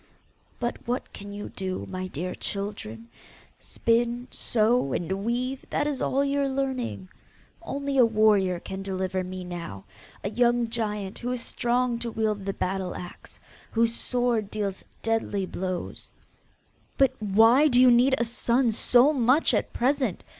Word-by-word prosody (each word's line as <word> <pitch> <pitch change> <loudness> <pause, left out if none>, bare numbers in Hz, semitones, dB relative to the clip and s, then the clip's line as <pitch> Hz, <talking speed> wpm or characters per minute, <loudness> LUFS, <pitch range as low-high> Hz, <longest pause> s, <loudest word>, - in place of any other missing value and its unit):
'But 240 -1 -2
what 245 +2 -3
can 200 0 -8
you 205 0 -6
do, 190 -1 -4
my 185 0 -4
dear 180 +2 -4
children? 195 - -5 0.5
Spin, 235 +1 0
sew, 220 - +2
and 190 +3 -2
weave 250 +3 -2
that 290 - 0
is 290 -3 -2
all 275 +2 +1
your 280 0 +1
learning. 265 -7 -2 0.5
Only 280 -4 -2
a 245 - +8
warrior 210 -5 +3
can 190 +2 -6
deliver 190 -1 -2
me 185 0 -6
now, 170 - -7 0.4
a 200 - -2
young 240 -1 +2
giant 210 -4 -2
who 245 +1 -3
is 250 -2 -3
strong 240 0 0
to 235 0 -3
wield 215 -3 -1
the 195 - -1
battle 190 -1 -2
axe: 175 - -10 0.3
whose 230 0 +2
sword 240 -4 0
deals 200 -3 -3 0.2
deadly 225 -3 0
blows.' 185 -1 -5 0.9
'But 270 -2 +4
WHY 225 +8 +5
do 250 -4 +4
you 255 -1 +7
need 250 +3 +5
a - - +1
son 235 +1 +1
so 250 +6 +4
much 260 +3 +3
at - - 0
present? 260 -5 0
225 Hz, 150 wpm, -26 LUFS, 195-250 Hz, 0.9 s, a